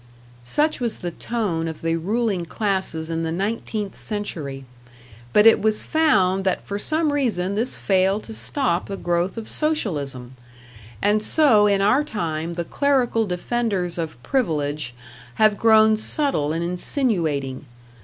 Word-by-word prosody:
Such 300 - 0
was 235 -3 -2
the 175 - -5
tone 180 -6 -2
of 160 -1 -7
the 165 0 +1
ruling 200 +2 -1
classes 190 -4 -2
in 165 0 -1
the 165 0 -2
nineteenth 205 +2 -3
century; 150 - -5 0.7
but 210 - +5
it 225 - +7
was 215 0 +1
found 195 -13 +2
that 190 -1 0
for 200 0 -4
some 310 +5 +2
reason 205 -10 0
this 230 +5 +1
failed 195 +2 +1
to 225 - -8
stop 220 -7 -1
the 195 - -5
growth 175 +3 -1
of 225 - -6
Socialism, 145 - -2 0.7
and 210 +1 +3
so 220 -5 +4
in 200 -1 +2
our 255 +9 +4
time 170 - -3
the 170 0 -3
clerical 250 - +1
defenders 185 -2 -2
of 160 -6 -4
Privilege 150 - -1 0.4
have 215 -1 +4
grown 220 0 +5
subtle 215 - 0
and 165 +2 -2
insinuating. 170 - -1
200 Hz, 145 wpm, -22 LUFS, 165-225 Hz, 0.7 s, it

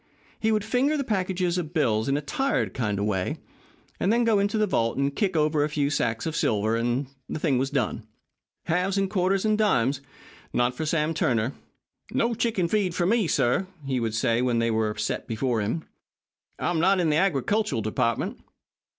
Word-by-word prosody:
He 220 - +1
would 215 -1 +1
finger 260 +7 +1
the 280 - 0
packages 185 -5 0
of 170 0 -6
bills 115 -6 +1
in 140 - +2
a 150 - -4
tired 270 - -1
kind 105 -6 -1
of 100 - -1
way, 95 -3 -1 0.6
and 195 - +2
then 240 +1 +3
go 225 -3 +3
into 200 +2 +1
the 215 - +3
vault 115 - 0
and 140 0 0
kick 190 -6 0
over 150 -1 +2
a 150 - 0
few 145 -1 0
sacks 115 -5 -1
of 160 -1 -2
silver, 110 -2 +1
and 120 +4 0 0.2
the - - -3
thing 145 -5 +1
was 135 +1 0
done. - - -2 0.6
Halves 180 +4 0
and 195 -1 0
quarters 190 0 +1
and 215 0 +2
dimes? 135 - +2 0.5
Not 120 +1 +2
for 155 +4 -4
Sam 155 0 +1
Turner. 120 -4 0 0.6
"No 235 +1 +1
chicken 220 -6 0
feed 190 -2 0
for 175 - +1
me," 210 -2 +2 0.6
he 130 -2 0
would 115 -2 -2
say 115 0 +1
when 125 -2 +1
they 115 0 +1
were 110 -1 0
set 110 - -2
before 115 0 0
him. 115 +11 -2 0.7
"I'm 175 -2 0
not 190 +3 +3
in 165 -3 +2
the 150 - +2
agricultural 195 - +1
department." 115 +2 -1
155 Hz, 195 wpm, -26 LUFS, 120-195 Hz, 0.7 s, then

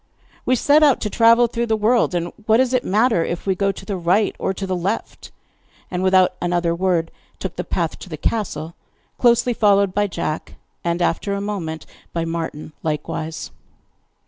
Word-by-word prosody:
'We 255 - +4
set 290 +5 +4
out 290 -4 +5
to 210 - -2
travel 230 +1 +5
through 235 0 -2
the 220 -1 +1
world, 220 -2 +2
and 175 0 -2
what 220 0 +5
does 255 0 +2
it 255 - +2
matter 215 -2 +2
if 170 - -4
we 195 - +2
go 195 +1 +1
to - - -11
the 200 - -3
right 185 +5 +2
or - - 0
to 195 +1 -4
the 185 -1 -1
left?' 190 +5 -3 0.6
And, 180 -1 -2
without 185 -1 +4
another 175 -1 +1
word, 170 -2 0 0.3
took - - -5
the - - -3
path - - -2
to - - -10
the - - -6
castle, 170 -7 -2 0.5
closely 240 0 +4
followed 200 -3 +3
by 205 +1 +1
Jack, 155 -4 -4 0.3
and 170 0 0
after 200 +4 0
a - - -2
moment 180 -6 -4 0.3
by 165 -1 -1
Martin 165 -2 -5
likewise. 160 - -4
190 Hz, 185 wpm, -21 LUFS, 170-220 Hz, 0.6 s, out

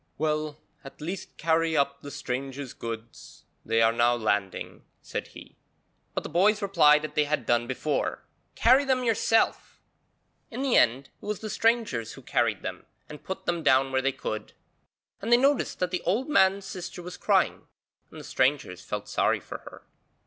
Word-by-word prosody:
'Well, 155 -1 -1 0.3
at 135 - -12
least 175 +5 -6
carry 160 0 +1
up 140 0 0
the 145 - -8
strangers' 135 -1 -5
goods; 115 0 -8 0.2
they 115 +1 +2
are 115 - +5
now 120 +1 +3
landing,' 105 -4 -2 0.2
said - - -5
he, - - -14 0.6
but - - -1
the - - -5
boys 205 +4 +3
replied 155 -7 +4
as 155 - -6
they 150 0 +2
had 150 +1 -1
done 120 0 +2
before, 140 +3 -2 0.3
'Carry 260 +4 +5
them 260 -2 +1
yourself.' 225 -1 +1 0.7
In 250 +3 -4
the 270 -3 +2
end, 130 +4 +3
it - - -12
was 210 -1 -3
the 215 -1 -5
strangers 220 - +1
who - - -13
carried - - 0
them - - -6 0.2
and 150 -1 -10
put 190 - -6
them 175 -1 -1
down 135 -2 +3
where 130 0 +1
they 135 +1 +1
could; 110 -4 -5 0.7
and 225 +4 -3
they 240 - +8
noticed 275 +2 +2
that 180 -1 -1
the 180 - -1
old 215 - 0
man's 195 -8 +3
sister 180 -2 -7
was 180 +1 -7
crying, - - +1 0.4
and - - -11
the - - -9
strangers 130 -9 0
felt - - -5
sorry - - +1
for - - -8
her. - - -13
155 Hz, 180 wpm, -27 LUFS, 130-195 Hz, 0.7 s, they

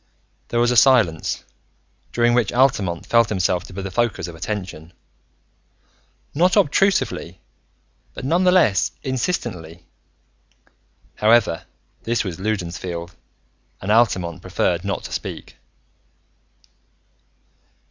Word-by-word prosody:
There 120 - -1
was 120 +1 +3
a - - +1
silence 115 - +3 0.7
during 120 0 +2
which 120 -4 +2
Altamont 105 -10 +1
felt 115 -2 +3
himself 90 -3 0
to - - -12
be 95 +1 -5
the 95 - -5
focus 120 -5 -1
of 85 - -8
attention; 90 -2 -6 1.4
not 180 +5 +3
obtrusively, 190 - +1 0.8
but, 135 - -7
nonetheless, 175 - +3
insistently. 95 - -3 1.3
However, 105 -6 +3 0.4
this 120 +1 -1
was 95 -4 -6
Loudon's 95 -4 -3
field 85 -1 -6 0.6
and 95 - -3
Altamont 95 -7 +2
preferred 85 0 -1
not 100 -1 -3
to - - -8
speak. - - -6
105 Hz, 105 wpm, -21 LUFS, 90-120 Hz, 1.4 s, was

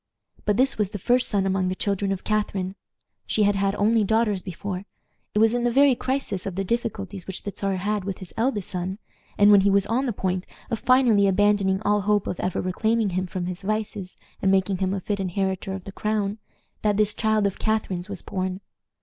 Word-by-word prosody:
But 210 -1 +2
this 260 -2 +2
was 205 -3 +1
the 205 - -5
first 245 +6 +2
son 200 -2 +1
among 190 -1 +1
the 185 - -1
children 200 0 -1
of 195 -1 -3
Catharine. 200 -3 -1 0.5
She 215 - +2
had 205 0 +4
had 195 0 0
only 220 +1 +3
daughters 215 -2 +1
before. 185 +1 -5 0.5
It - - +2
was 225 +1 +5
in 240 0 0
the 240 - +3
very 275 +2 +5
crisis 255 -7 -2
of 190 - -4
the 195 - -1
difficulties 200 -3 -3
which 190 - -5
the 200 - -5
Czar 195 -1 -1
had 205 +2 -1
with 195 -1 -4
his 185 - -9
eldest 225 -4 -1
son, 185 +1 -3 0.4
and 205 0 +7
when 200 -1 +8
he 200 - +3
was 200 0 +3
on 245 +6 0
the - - +1
point 185 -3 -2 0.2
of 230 - -1
finally 240 -6 +4
abandoning 195 0 +2
all 205 0 +2
hope 205 0 +2
of 180 - -4
ever 180 - -1
reclaiming 220 +3 0
him 185 +1 -1
from 180 0 -4
his 180 +1 -5
vices 205 -2 -3 0.2
and 195 - +2
making 190 0 +2
him 190 0 0
a - - -2
fit 200 +2 -2
inheritor 190 0 -2
of 190 -1 -6
the 195 - -8
crown, 210 0 -1 0.4
that 210 -1 +1
this 210 -1 +2
child 215 -1 +1
of 200 - -1
Catharine's 210 -4 -1
was 195 -3 -5
born. 185 0 -3
200 Hz, 220 wpm, -25 LUFS, 190-215 Hz, 0.5 s, when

